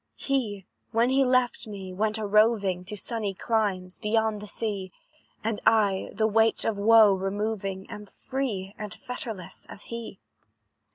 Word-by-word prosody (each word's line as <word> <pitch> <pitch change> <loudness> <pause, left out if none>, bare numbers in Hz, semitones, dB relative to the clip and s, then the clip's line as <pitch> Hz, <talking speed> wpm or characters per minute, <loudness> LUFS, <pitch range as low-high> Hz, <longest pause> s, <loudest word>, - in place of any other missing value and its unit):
"He, 220 -9 -1 0.3
when 235 +2 +3
he 270 +1 +4
left 255 -2 +1
me, 195 -3 -7
went 215 +3 0
a 215 - -3
roving 205 -3 +3
To 210 +3 -6
sunny 205 -1 -2
climes, 195 -5 -1
beyond 220 -1 +1
the 210 - -8
sea; 200 -3 -3 0.5
And 220 -1 -1
I, 205 -4 +3
the 220 +1 0
weight 220 +1 +3
of 225 - +1
woe 215 0 +6
removing, 195 0 -2
Am 210 0 -9
free 215 -7 -4
and 210 -1 -6
fetterless 225 -7 -7
as 200 - -10
he. 235 -1 -6
210 Hz, 150 wpm, -27 LUFS, 195-225 Hz, 0.5 s, woe